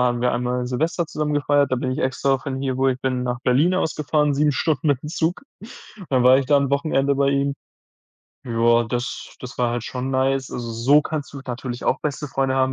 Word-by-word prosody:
haben 120 -1 +1
wir 125 - +2
einmal 125 0 -1
Silvester 160 +7 -1
zusammen 150 -1 -2
gefeiert, 145 -1 +2
da - - +3
bin 130 +1 -2
ich - - -4
extra 130 +1 +1
von 130 -1 -5
hier, 130 -2 -1
wo 135 0 +3
ich 130 -1 -1
bin, 130 -1 -1
nach 125 -1 -2
Berlin 150 +9 +3
aus 175 -3 0
gefahren, 150 -1 +1
7 145 +1 +2
Stunden 150 +1 0
mit'm 140 +2 -2
Zug. 165 - -1 0.7
Dann 130 -2 +3
war 130 +1 +7
ich 135 - -2
da 145 - +4
'n 140 -1 0
Wochenende 140 -1 +1
bei 140 0 +2
ihm. 140 0 0 0.9
Ja, 115 0 +3
das 120 +1 -5
das 125 0 -9
war 120 -1 +1
halt 120 -1 -2
schon 130 +1 -4
nice. 135 0 0
Also 120 -1 -5
so 135 +6 +4
kannst 155 -3 -5
du 140 - -7
natürlich 125 0 -5
auch 130 - +1
beste 150 0 -3
Freunde 135 0 0
haben, 130 0 +2
135 Hz, 220 wpm, -22 LUFS, 125-145 Hz, 0.9 s, war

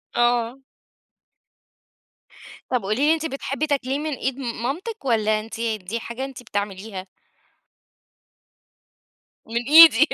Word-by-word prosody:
آه. 240 +1 +1 2.1
طب 250 -2 +1
قولي 210 +2 -1
لي 315 - +5
أنتِ 320 0 -2
بتحبّي 280 0 -3
تاكليه 275 -1 -1
من 305 0 -3
إيد 265 0 -3
مامتِك 275 - -4
والّا 215 -3 +2
أنتِ 225 +1 -8
دي 220 -1 -3
حاجة 235 +3 -5
أنتِ 265 -2 -10
بتعمليها؟ 200 -2 -5 2.4
من 230 +1 -1
إيدي. 310 -2 +9
240 Hz, 105 wpm, -23 LUFS, 225-275 Hz, 2.4 s, إيدي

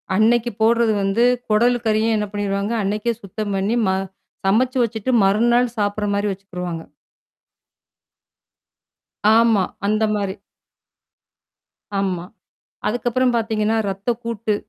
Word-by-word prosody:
அன்னைக்கு 235 +3 +3
போடுறது 230 0 +3
வந்து 195 +4 +2 0.3
குடல்கறியும் 225 0 +2
என்ன 210 - -1
பண்ணிருவாங்க, 200 +1 -2
அன்னைக்கே 210 +4 -1
சுத்தம் 205 +1 -4
பண்ணி 205 +5 0
ம - - +2 0.6
சமைச்சு 250 +7 +2
வச்சுட்டு 225 +1 -2
மறுநாள் 235 +4 +3
சாப்பிடுற 205 0 -1
மாதிரி 200 +1 0
வச்சுக்குருவாங்க. 180 -3 -6 2.5
ஆமா. 225 -4 +4 0.2
அந்த 215 +1 +1
மாரி. 200 -2 -3 1.6
ஆமா. 185 -3 -2 0.6
அதுக்கப்புறம் 245 +2 0
பார்த்தீங்கன்னா, 220 -1 0
ரத்தக்கூட்டு. 225 +1 -2
215 Hz, 95 wpm, -21 LUFS, 200-235 Hz, 2.5 s, ஆமா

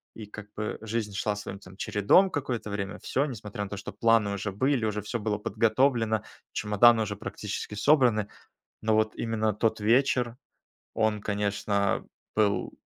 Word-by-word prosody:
И 110 - -8
как 105 0 -9
бы 105 0 -3
жизнь 110 -1 -3
шла 105 +2 -1
своим 100 -1 -7
там 95 -1 -15
чередом 105 - +4
какое-то 130 -7 -3
время, 100 -1 -4
всё, 135 - 0
несмотря 105 -6 -5
на - - -9
то 100 - -5
что 100 - -7
планы 115 -2 +3
уже 100 0 -3
были, 130 +3 +1
уже 105 -1 -1
всё 110 +4 -3
было 105 -1 -1
подготовлено, 110 +1 +2 0.3
чемоданы 110 +2 +5
уже 105 -1 -4
практически 105 - -5
собраны, 120 -4 +3 0.5
но 110 0 +2
вот 110 0 +1
именно 110 -2 0
тот 110 +1 0
вечер, 120 +1 +2 0.6
он, 110 -2 +1
конечно, 100 -1 0 0.3
был 105 -2 +1
110 Hz, 160 wpm, -28 LUFS, 105-115 Hz, 0.6 s, чемоданы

